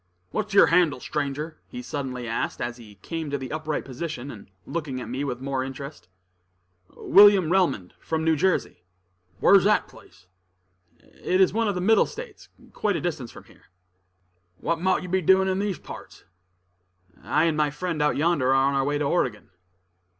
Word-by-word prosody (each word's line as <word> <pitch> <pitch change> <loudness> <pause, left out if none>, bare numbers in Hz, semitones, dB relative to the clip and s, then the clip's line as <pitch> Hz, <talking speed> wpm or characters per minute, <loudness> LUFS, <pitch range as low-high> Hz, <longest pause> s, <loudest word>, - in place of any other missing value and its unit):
"What's 210 -1 -3
yer - - +8
handle, 170 -6 +3
stranger?" 150 +3 -4
he 250 -1 -7
suddenly 130 - -5
asked, 115 - -3
as 120 0 -4
he 110 -4 -14
came 165 -2 -4
to 140 - -1
the 130 -2 -7
upright 155 -1 -3
position, 140 0 -6
and 100 -4 -12 0.2
looking 150 -6 -4
at - - -7
me 130 +3 -3
with 125 -3 -4
more 135 -1 -2
interest. 135 - -8 0.9
"William 195 -4 +6
Relmond, 165 - +1
from 160 -1 -2
New 160 0 +3
Jersey." 185 - 0 0.6
"Whar's 195 -2 +6
that 210 0 +3
place?" - - -18 1.0
"It 185 - +1
is 190 -1 +4
one 225 +1 +1
of 200 - -1
the 180 - -2
Middle 215 +3 +4
States, 470 -3 -10 0.2
quite 205 -3 0
a - - -1
distance 145 -9 -4
from - - -13
here." - - -22 0.9
"What 170 - -2
mought 185 0 +1
you - - -6
be 185 +1 0
doin' 190 +3 +4
in 190 0 0
these 200 -2 -2
parts?" - - -11 1.0
"I - - +1
and 165 -2 +2
my 150 -1 +2
friend 155 +2 -3
out 150 - +2
yonder 150 -3 +1
are - - +4
on 135 +1 +3
our 135 -1 +1
way 145 +1 0
to 145 - -1
Oregon." 130 - -1
155 Hz, 180 wpm, -25 LUFS, 135-185 Hz, 1.0 s, yer